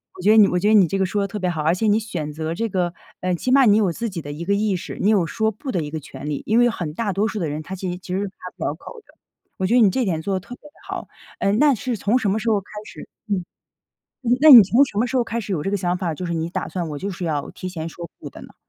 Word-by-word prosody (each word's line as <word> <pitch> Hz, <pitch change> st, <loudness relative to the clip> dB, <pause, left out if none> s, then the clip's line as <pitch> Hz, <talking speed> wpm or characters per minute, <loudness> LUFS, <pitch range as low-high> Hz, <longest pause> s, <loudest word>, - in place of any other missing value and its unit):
我 -, -, -9 dB
觉 205 Hz, +4 st, +4 dB
得 220 Hz, -, +6 dB
你 210 Hz, -2 st, +8 dB
我 180 Hz, -, 0 dB
觉 190 Hz, +4 st, +1 dB
得 215 Hz, -, +4 dB
你 200 Hz, -5 st, +6 dB
这 195 Hz, -, -2 dB
个 190 Hz, -, +2 dB
说 200 Hz, +3 st, -1 dB
得 200 Hz, -, -1 dB
特 210 Hz, -, -6 dB
别 185 Hz, -3 st, -1 dB
好， 160 Hz, -3 st, -2 dB
而 160 Hz, +3 st, +2 dB
且 220 Hz, -, -1 dB
你 210 Hz, +1 st, +4 dB
选 175 Hz, -9 st, -5 dB
择 160 Hz, +2 st, -4 dB
这 230 Hz, +5 st, -1 dB
个 180 Hz, -3 st, -1 dB, 0.3 s
嗯， 185 Hz, -1 st, 0 dB
起 250 Hz, -, -2 dB
码 270 Hz, 0 st, +6 dB
你 210 Hz, -2 st, +5 dB
有 205 Hz, -5 st, +2 dB
自 230 Hz, +7 st, -4 dB
己 180 Hz, -4 st, -5 dB
的 145 Hz, -, -7 dB
一 155 Hz, +4 st, -6 dB
个 200 Hz, -, +1 dB
意 205 Hz, -1 st, +1 dB
识， 175 Hz, -, -6 dB
你 200 Hz, -, +3 dB
有 195 Hz, -6 st, +3 dB
说 220 Hz, +6 st, 0 dB
不 260 Hz, +6 st, -6 dB
的 180 Hz, -, -1 dB
一 150 Hz, -, -6 dB
个 160 Hz, -, -3 dB
权 140 Hz, -1 st, -9 dB
利。 150 Hz, -2 st, -3 dB
因 220 Hz, -, +2 dB
为 240 Hz, 0 st, +5 dB
很 170 Hz, -9 st, -4 dB
大 205 Hz, +2 st, -2 dB
多 200 Hz, +4 st, +1 dB
数 220 Hz, -, -4 dB
的 170 Hz, -, -1 dB
人 150 Hz, +1 st, -4 dB
他 190 Hz, +5 st, -7 dB
其 185 Hz, -1 st, -4 dB
实 175 Hz, -, -5 dB
其 180 Hz, 0 st, -7 dB
实 195 Hz, -, -1 dB
开 195 Hz, -, -9 dB, 0.2 s
不 165 Hz, -, -4 dB
了 -, -, 0 dB
口 460 Hz, -, -11 dB
的。 -, -, -23 dB, 0.4 s
我 190 Hz, -, -1 dB
觉 190 Hz, -, +1 dB
得 250 Hz, -, +6 dB
你 210 Hz, -, +6 dB
这 250 Hz, +6 st, 0 dB
点 165 Hz, -5 st, -1 dB
做 195 Hz, +4 st, -2 dB
得 -, -, -1 dB
特 200 Hz, +7 st, -10 dB
别 -, -, -30 dB
地 -, -, -36 dB
好， -, -, -5 dB, 0.3 s
嗯， 200 Hz, +2 st, +1 dB
那 295 Hz, 0 st, +5 dB
是 240 Hz, +3 st, -3 dB
从 210 Hz, +5 st, +2 dB
什 210 Hz, -, 0 dB
么 200 Hz, -, +1 dB
时 220 Hz, -, -4 dB
候 210 Hz, -2 st, +2 dB
开 195 Hz, -, -24 dB, 0.2 s
始 -, -, -11 dB, 0.2 s
嗯， 200 Hz, -4 st, -1 dB, 0.8 s
那 235 Hz, -, -1 dB
那 310 Hz, -, +7 dB
你 245 Hz, -5 st, +12 dB
从 225 Hz, +8 st, +4 dB
什 205 Hz, -, -11 dB
么 225 Hz, +4 st, +2 dB
时 250 Hz, -, -6 dB
候 255 Hz, -, +3 dB
开 230 Hz, 0 st, -3 dB
始 205 Hz, -2 st, -5 dB
有 160 Hz, -5 st, -1 dB
这 195 Hz, -, -2 dB
个 205 Hz, -, +1 dB
想 180 Hz, -2 st, -1 dB
法， 175 Hz, -4 st, -2 dB
就 180 Hz, -, -6 dB
是 170 Hz, -, -3 dB
你 165 Hz, 0 st, -2 dB
打 170 Hz, -, -3 dB
算 175 Hz, -3 st, -4 dB
我 150 Hz, -2 st, -5 dB
就 200 Hz, +7 st, -4 dB
是 185 Hz, -1 st, -8 dB
要 145 Hz, -3 st, -2 dB
提 185 Hz, -, -7 dB
前 165 Hz, -3 st, -5 dB
说 170 Hz, +1 st, -8 dB
“不” -, -, -9 dB
的 -, -, -11 dB
呢？ -, -, -13 dB
195 Hz, 365 characters per minute, -22 LUFS, 170-220 Hz, 0.8 s, 你